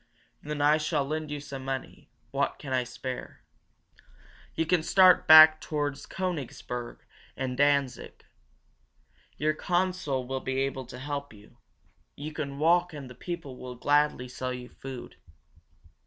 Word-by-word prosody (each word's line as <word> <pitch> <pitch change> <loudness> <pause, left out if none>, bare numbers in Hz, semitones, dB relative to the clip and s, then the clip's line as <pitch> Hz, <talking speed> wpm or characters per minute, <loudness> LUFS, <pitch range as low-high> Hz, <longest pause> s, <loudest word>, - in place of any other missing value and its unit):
"Then 150 -1 -3
I 150 +1 +5
shall 155 -2 0
lend 155 +1 -3
you 150 0 -4
some 140 -2 -8
money 135 0 -6 0.2
what - - 0
I - - -26
can 130 -3 -2
spare. 125 0 -7 1.1
You 165 - 0
can 175 +1 +2
start 185 +2 +5
back 155 0 +10
toward 145 -2 -2 0.2
Koenigsberg 140 -9 -5 0.4
and 130 -1 -2
Danzig. 140 -1 0 1.1
Your 155 +1 +1
consul 175 -6 -1
will 130 +1 -3
be 130 0 -3
able 135 -2 -3
to 125 - -9
help 140 0 -5
you. 105 0 -18 0.6
You 150 +2 -7
can 140 -3 -5
walk 175 +3 +3
and 140 -4 -8
the - - -9
people 155 -1 -7
will 125 -1 -8
gladly 145 -1 +2
sell 130 +1 -4
you 125 -1 -7
food." 130 -2 -9
145 Hz, 140 wpm, -28 LUFS, 130-155 Hz, 1.1 s, back